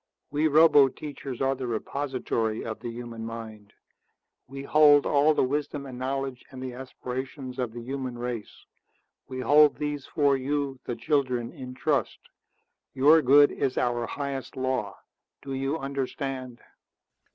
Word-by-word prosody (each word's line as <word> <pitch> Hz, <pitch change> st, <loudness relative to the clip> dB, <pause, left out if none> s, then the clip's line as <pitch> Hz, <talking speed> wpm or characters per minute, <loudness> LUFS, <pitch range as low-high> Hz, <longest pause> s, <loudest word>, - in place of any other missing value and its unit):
We 150 Hz, +2 st, +2 dB
roboteachers 145 Hz, -3 st, +3 dB
are 135 Hz, 0 st, +2 dB
the 130 Hz, -1 st, -5 dB
repository 120 Hz, -2 st, -2 dB
of 110 Hz, -1 st, -5 dB
the 120 Hz, -, -5 dB
human 115 Hz, -1 st, -7 dB
mind. 110 Hz, -2 st, -8 dB, 0.8 s
We 135 Hz, +1 st, -7 dB
hold 145 Hz, 0 st, +6 dB
all 150 Hz, +2 st, +4 dB
the -, -, +3 dB
wisdom 145 Hz, +1 st, -2 dB
and 130 Hz, -2 st, -8 dB
the -, -, -2 dB
knowledge 135 Hz, -1 st, -3 dB
and 130 Hz, -, -10 dB
the 130 Hz, -1 st, -5 dB
aspirations 130 Hz, +1 st, -6 dB
of 125 Hz, -3 st, -1 dB
the 120 Hz, +1 st, -8 dB
human 130 Hz, -1 st, -4 dB
race. 120 Hz, -3 st, -6 dB, 0.6 s
We 130 Hz, -1 st, -5 dB
hold 150 Hz, +2 st, +6 dB
these 150 Hz, -1 st, -3 dB
for 140 Hz, -2 st, +2 dB
you, 135 Hz, 0 st, -2 dB
the 120 Hz, -, -3 dB
children, 130 Hz, -5 st, 0 dB
in 125 Hz, -1 st, -9 dB
trust. 140 Hz, +2 st, 0 dB, 0.8 s
Your 150 Hz, +4 st, +6 dB
good 145 Hz, +2 st, +6 dB
is 135 Hz, -2 st, -2 dB
our 120 Hz, -1 st, 0 dB
highest 140 Hz, -2 st, -5 dB
law. 130 Hz, -6 st, -2 dB, 0.5 s
Do 135 Hz, -1 st, -5 dB
you 135 Hz, +3 st, -1 dB
understand?" 135 Hz, -3 st, -4 dB
135 Hz, 145 wpm, -27 LUFS, 125-140 Hz, 0.8 s, hold